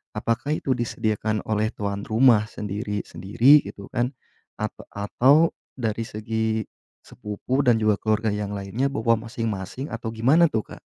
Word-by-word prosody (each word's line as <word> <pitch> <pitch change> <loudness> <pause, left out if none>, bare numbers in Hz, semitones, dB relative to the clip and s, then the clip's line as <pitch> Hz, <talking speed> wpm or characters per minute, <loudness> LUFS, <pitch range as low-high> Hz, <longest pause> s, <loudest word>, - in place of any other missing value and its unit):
apakah 120 +6 -1
itu 135 - -2
disediakan 110 -2 -1
oleh 110 +1 0
tuan 100 -1 -4
rumah 110 -1 +4
sendiri-sendiri, 105 +6 +2
gitu 100 - -9
kan, 120 +3 -1 0.5
at 110 - -1 0.2
atau 135 +10 +4 0.2
dari 115 -2 -2
segi 110 0 -2 0.4
sepupu 105 +6 -3
dan 120 -2 +5
juga 110 -2 +2
keluarga 110 0 +1
yang 105 -1 -3
lainnya 100 +7 -1
bawa 115 -4 +2
masing-masing 115 +2 -4
atau 115 0 -4
gimana 135 +10 +4
tuh, 110 -6 -1
Kak? - - -11
110 Hz, 135 wpm, -24 LUFS, 105-120 Hz, 0.5 s, dan